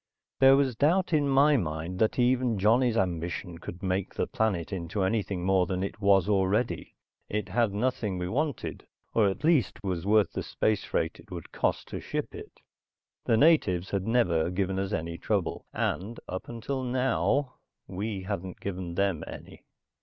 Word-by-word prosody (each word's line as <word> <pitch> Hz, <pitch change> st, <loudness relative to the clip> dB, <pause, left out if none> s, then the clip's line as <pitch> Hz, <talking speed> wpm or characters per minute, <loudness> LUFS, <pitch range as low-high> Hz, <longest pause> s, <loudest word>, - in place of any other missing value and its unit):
There 135 Hz, 0 st, +7 dB
was 135 Hz, -4 st, +1 dB
doubt 170 Hz, +8 st, +2 dB
in 145 Hz, -2 st, +3 dB
my 140 Hz, +2 st, +5 dB
mind 85 Hz, -1 st, -3 dB
that 110 Hz, -, +2 dB
even 125 Hz, -2 st, +2 dB
Johnny's 115 Hz, +4 st, +3 dB
ambition 90 Hz, -1 st, -2 dB
could 90 Hz, +2 st, -9 dB
make 95 Hz, 0 st, -1 dB
the -, -, 0 dB
planet 100 Hz, -4 st, -1 dB
into 95 Hz, +2 st, -2 dB
anything 95 Hz, -3 st, -1 dB
more 95 Hz, -2 st, +3 dB
than 95 Hz, 0 st, -2 dB
it 100 Hz, +2 st, -5 dB
was 100 Hz, -2 st, +4 dB
already. 100 Hz, -1 st, 0 dB, 0.3 s
It 105 Hz, 0 st, -2 dB
had 115 Hz, +2 st, +2 dB
nothing 105 Hz, -2 st, -1 dB
we 90 Hz, 0 st, -2 dB
wanted, 145 Hz, -, -3 dB, 0.3 s
or 105 Hz, -3 st, +4 dB
at 95 Hz, -, -5 dB
least 150 Hz, -, +2 dB
was 90 Hz, -4 st, -2 dB
worth 105 Hz, -3 st, +4 dB
the -, -, -3 dB
space 110 Hz, -2 st, 0 dB
freight -, -, -2 dB
it -, -, -16 dB
would -, -, -8 dB
cost -, -, -1 dB
to -, -, -4 dB
ship -, -, -4 dB
it. -, -, -11 dB, 0.6 s
The 115 Hz, -, +3 dB
natives 105 Hz, -, +3 dB
had 100 Hz, 0 st, -1 dB
never 90 Hz, -9 st, +2 dB
given 95 Hz, +1 st, -1 dB
us 95 Hz, +1 st, -2 dB
any 85 Hz, -3 st, -3 dB
trouble, 100 Hz, -5 st, -2 dB
and, 105 Hz, +6 st, -2 dB
up 95 Hz, -, -5 dB
until 120 Hz, +3 st, -3 dB
now, 130 Hz, +2 st, 0 dB, 0.3 s
we 100 Hz, +1 st, -4 dB
hadn't 95 Hz, -2 st, -5 dB
given 90 Hz, -3 st, -5 dB
them 95 Hz, -5 st, 0 dB
any. -, -, -10 dB
100 Hz, 170 wpm, -28 LUFS, 90-120 Hz, 0.6 s, There